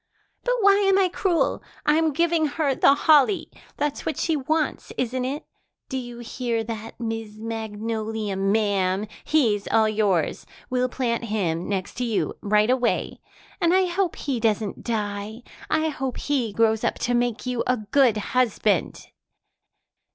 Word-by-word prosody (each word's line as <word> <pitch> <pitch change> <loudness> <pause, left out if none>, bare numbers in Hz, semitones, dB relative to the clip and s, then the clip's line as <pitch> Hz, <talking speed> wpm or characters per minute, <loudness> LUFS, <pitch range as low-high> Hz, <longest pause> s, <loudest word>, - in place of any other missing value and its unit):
But - - +1
why 400 0 +6
am 390 -1 +4
I 380 -2 +3
cruel? 355 -2 0 0.2
I'm 315 +1 +3
giving 335 +1 +2
her 290 -1 0
the 275 - +5
holly. 305 +4 +4 0.3
That's 290 -1 -2
what 315 - -2
she 325 - +1
wants, 305 +2 -1
isn't 255 +1 -1
it? 280 +4 -4 0.4
Do 265 - -2
you 240 -1 -8
hear 235 -1 -2
that, 225 0 -7
Miss 225 -2 -4
Magnolia, 220 -1 -3
ma'am? 195 -1 +1 0.2
He's 225 -10 +2
all 220 -1 +3
yours. 205 -6 0 0.2
We'll 255 0 +1
plant 240 -2 -1
him 180 -6 -1
next 190 -2 -2
to - - 0
you 230 -3 0
right 210 +3 +3
away. 250 -2 0 0.4
And 340 +1 +4
I 380 0 +4
hope 360 0 -1
he 270 -4 -2
doesn't 215 -2 0
die. 215 0 -3 0.3
I 315 0 +1
hope 265 -4 -4
he 260 -7 -1
grows 220 +1 +2
up - - +1
to 245 - -1
make 240 -1 0
you 250 -2 -1
a 250 - +2
good 230 +1 +3
husband." 215 -4 0
240 Hz, 150 wpm, -24 LUFS, 215-290 Hz, 0.4 s, why